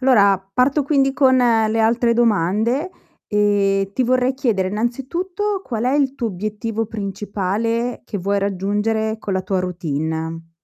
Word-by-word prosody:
Allora 205 -7 +4
parto, 265 +6 +2
quindi, 275 -1 +2
con 265 -1 +4
le 225 -3 +3
altre 235 +1 +3
domande. 230 - +1 0.4
E 200 -2 +2
ti 260 - +1
vorrei 255 +1 +2
chiedere, 225 -9 0
innanzitutto, 340 - -2
qual 230 -2 -3
è 255 - +2
il 275 -2 +1
tuo 240 -4 -2
obiettivo 215 +3 -3
principale, 210 +3 -2
che 205 - -5
vuoi 200 +2 0
raggiungere 205 +3 -1
con 205 - -4
la 190 0 0
tua 190 0 -1
routine? 165 -1 -3
220 Hz, 140 wpm, -20 LUFS, 195-250 Hz, 0.4 s, Allora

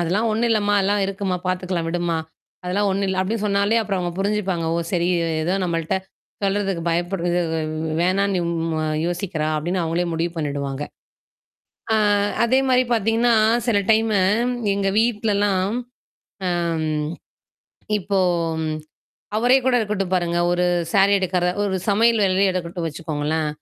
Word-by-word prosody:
"அதெல்லாம் 195 +7 +1
ஒன்னும் 230 +2 +1
இல்லம்மா! 205 -2 +2
அதல்லாம் 200 +1 +1
இருக்கும்மா! 195 -2 -2
பாத்துக்கலாம் 185 -2 -1
விடும்மா! 175 0 -1 0.5
அதெல்லாம் 200 +3 0
ஒன்னும் 195 +1 0
இல்ல." 190 0 -1
அப்பிடி 205 +5 -1
சொன்னாலே 200 +3 +2
அப்புறம் 195 -3 -2
அவுங்க 175 -1 -2
புரிஞ்சுப்பாங்க. 195 -4 -1
"ஓ! - - 0
சரி 175 -1 +1
இவ 170 - 0 0.2
ஏதோ 180 +4 +1
நம்மள்ட்ட 165 +1 -1 0.5
சொல்றதுக்கு 195 -3 0
பயப்படுருது 175 +1 0
வ் - - -1
வே - - -2 0.4
வேணான்னு 190 +1 +1
ம் 165 -1 -2
அ - - -1 0.2
யோசிக்கிறா!" 175 -3 -2
அப்பிடின்னு 175 +4 -1
அவுங்களே 170 +2 -1
முடிவு 165 +1 -1
பண்ணிடுவாங்க. 140 -2 -3 1.1
ஆ - - +4 0.5
அதேமாரி 255 +1 +3
பாத்தீங்கன்னா, 225 +2 +2 0.3
சில 225 - +3
டைம்மு 220 -2 +3 0.5
எங்க 200 -1 0
வீட்லலாம், 205 -3 +1 0.7
அ - - +1 0.4
ம். 150 -1 -1 0.9
இப்போ, 200 +1 -1 1.2
அவரே 245 +4 +4
கூட 260 -1 +2
இருக்கட்டும் 205 -4 -2
பாருங்க. 175 -1 0
ஒரு 175 0 +1 0.3
சாரி 200 0 +5
எடுக்கிற 180 -1 0 0.2
ஒரு 190 -2 0
சமையல் 225 +2 +3
வேலையே 190 +1 +3
எடுக்கட்டும் 170 -1 -3
வச்சுக்கோங்களேன். 155 0 -2
190 Hz, 135 wpm, -22 LUFS, 170-205 Hz, 1.2 s, சாரி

